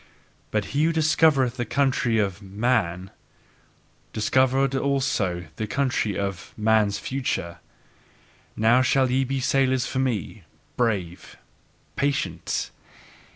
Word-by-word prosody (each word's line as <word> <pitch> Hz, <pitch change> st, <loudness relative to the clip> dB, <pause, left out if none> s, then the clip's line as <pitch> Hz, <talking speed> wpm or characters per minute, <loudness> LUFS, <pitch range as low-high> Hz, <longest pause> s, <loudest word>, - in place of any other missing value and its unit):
But 105 Hz, -1 st, -1 dB
he 145 Hz, +2 st, +2 dB
who 165 Hz, -, +2 dB
discovered 155 Hz, -5 st, +3 dB
the 120 Hz, 0 st, -4 dB
country 125 Hz, -2 st, +1 dB
of 100 Hz, -2 st, -1 dB
"man," 100 Hz, -3 st, -1 dB, 1.0 s
discovered 130 Hz, +4 st, +2 dB
also 130 Hz, -11 st, 0 dB
the 110 Hz, -, -3 dB
country 130 Hz, -6 st, -1 dB
of 100 Hz, -3 st, -5 dB
"man's 110 Hz, -2 st, +2 dB
future." 125 Hz, -10 st, -3 dB, 1.0 s
Now 115 Hz, +3 st, +4 dB
shall 130 Hz, 0 st, +2 dB
ye 130 Hz, +1 st, +2 dB
be 135 Hz, +1 st, -2 dB
sailors 130 Hz, 0 st, +1 dB
for 130 Hz, -, -3 dB
me, 115 Hz, -4 st, -2 dB, 0.3 s
brave, 100 Hz, -8 st, -2 dB, 0.6 s
patient! 95 Hz, -, -2 dB
125 Hz, 110 wpm, -24 LUFS, 100-135 Hz, 1.0 s, Now